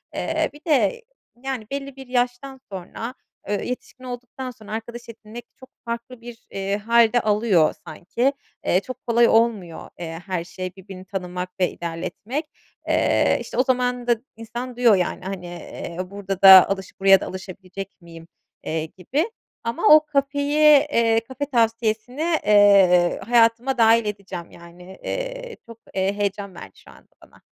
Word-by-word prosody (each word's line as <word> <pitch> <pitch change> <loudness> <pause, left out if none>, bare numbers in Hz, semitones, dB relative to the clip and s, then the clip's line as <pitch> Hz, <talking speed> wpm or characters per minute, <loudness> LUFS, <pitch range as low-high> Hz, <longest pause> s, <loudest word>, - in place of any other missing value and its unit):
Eee, - - -1
bir 295 - -15
de, 330 - +2 0.4
yani, 260 -5 -4
belli 275 -1 -5
bir 265 -1 -11
yaştan 250 +2 -2
sonra, 195 +6 -6 0.4
eee, 205 -1 -1
yetişkin 250 +1 -7
olduktan 250 +1 -7
sonra 215 -3 -14
arkadaş 230 +2 -5
edinmek 225 +1 -10
çok 260 - -14 0.2
farklı 235 +1 -6
bir, 240 0 -12
eee, 195 +1 -2
hâl 230 +2 +3
de 245 - +4
alıyor 210 -6 +3
sanki. 230 - -1 0.3
Eee, 180 - +3
çok 255 +6 -10
kolay 235 0 +4
olmuyor, 220 -7 +1
eee, 165 -1 -6
her 185 -3 -2
şey 185 +1 -6
birbirini 190 -1 -11
tanımak 180 -1 -5
ve 180 - +2
ilerletmek. 185 - -5 0.4
Eee, - - +2
işte, - - -7
o 255 - +4
zaman 250 -2 0
da 240 - +4 0.2
insan 240 +3 -7
diyor, 240 -3 +5
yani, 180 0 -2
hani, 190 -2 -5
eee, 175 -1 -8
burada 195 -2 -5
da 190 -1 +10
alış 190 -1 -5
buraya 195 0 +6
da - - -4
alışabilecek 190 +1 -8
miyim, 165 -1 -13 0.4
eee, 160 0 -2
gibi 265 - -2 0.3
ama 230 0 -1
o 310 0 +4
kafeyi 285 0 0 0.3
eee, 230 -2 +3
kafe 270 +2 -4
tavsiyesini, 230 0 0 0.2
eee, 195 -4 +5
hayatıma 235 +3 +3
dâhil 230 0 +5
edeceğim, 195 -4 -6
yani, 175 +2 -14
eee, - - -5
çok, 230 -1 -13
eee, 190 +1 0
heyecan 200 -1 -3
verdi 95 - -11
şu - - -17
anda - - -20 0.2
bana. - - -23
225 Hz, 155 wpm, -23 LUFS, 190-250 Hz, 0.4 s, da